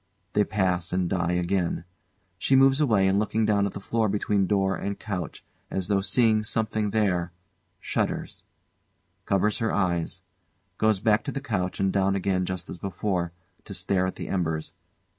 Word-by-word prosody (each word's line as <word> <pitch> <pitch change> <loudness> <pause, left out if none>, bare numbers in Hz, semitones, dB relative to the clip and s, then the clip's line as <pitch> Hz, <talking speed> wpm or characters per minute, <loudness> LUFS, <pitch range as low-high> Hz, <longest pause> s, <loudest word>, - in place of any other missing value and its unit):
They 105 - +4
pass 90 -5 0
and 90 -1 +1
die 85 -1 0
again. 90 -1 0 0.6
She 135 - +3
moves 135 +2 +5
away 105 -9 +3
and 95 +1 +3
looking 110 +1 +1
down 100 -2 +2
at 100 - -6
the - - -5
floor 110 +2 0
between 100 -1 +1
door 95 -1 +2
and 100 +4 -3
couch, 90 -7 -5 0.2
as 95 0 -2
though 100 -1 +3
seeing 110 +1 +3
something 110 -1 -1
there; 95 -5 +1 0.5
shudders; - - -2 0.9
covers 100 +2 +2
her 115 - 0
eyes; 85 -4 -1 0.6
goes 110 -2 +3
back 105 +1 +3
to - - -2
the 140 - -3
couch 95 -9 -2
and 95 -1 +1
down 95 0 +2
again 95 -1 0
just 95 -1 -4
as 90 - -7
before, 95 -2 -2 0.3
to - - -7
stare 95 -1 +1
at 95 - -4
the - - -6
embers. 80 -4 -2
100 Hz, 170 wpm, -26 LUFS, 90-105 Hz, 0.9 s, moves